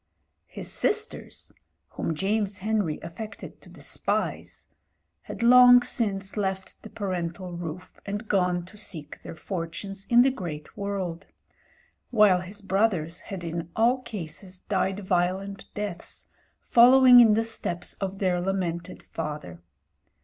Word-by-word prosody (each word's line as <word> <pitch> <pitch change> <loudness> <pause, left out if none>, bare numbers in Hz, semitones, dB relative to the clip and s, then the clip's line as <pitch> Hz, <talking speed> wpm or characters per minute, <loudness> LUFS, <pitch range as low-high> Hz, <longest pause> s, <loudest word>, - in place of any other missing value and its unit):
His - - -6
sisters 435 +1 -1 0.2
— - - -50
whom 165 - -3
James 200 +3 0
Henry 205 -6 -1
affected 200 +7 -8
to - - -16
despise - - -3 0.3
— - - -34
^had - - -4
long 245 0 +8
since 200 -6 -1
left 190 -2 -3
the 220 - -10
parental 180 -3 -4
roof 175 +1 -7
and 205 +3 -5
gone 180 -3 +1
to 210 +4 -14
seek 160 -8 -6
their - - -8
Fortunes 190 +3 -5
in 240 0 +6
the 270 - +3
great 165 - -7
world; 195 -3 -4 0.8
while 210 -6 +5
his 200 +3 -8
brothers 185 -4 0
had 190 -3 -7
in 170 0 -4
all 245 +3 +3
cases 185 -3 -7
died 195 0 -1
violent 190 +2 -1
deaths, 205 -4 -5 0.3
following 250 +1 +7
in 225 -3 +7
the 225 - +2
steps 180 -6 -3
of 195 0 -3
their 185 -3 +1
lamented 175 -3 -3
father. 150 - -6
195 Hz, 135 wpm, -26 LUFS, 175-215 Hz, 0.8 s, long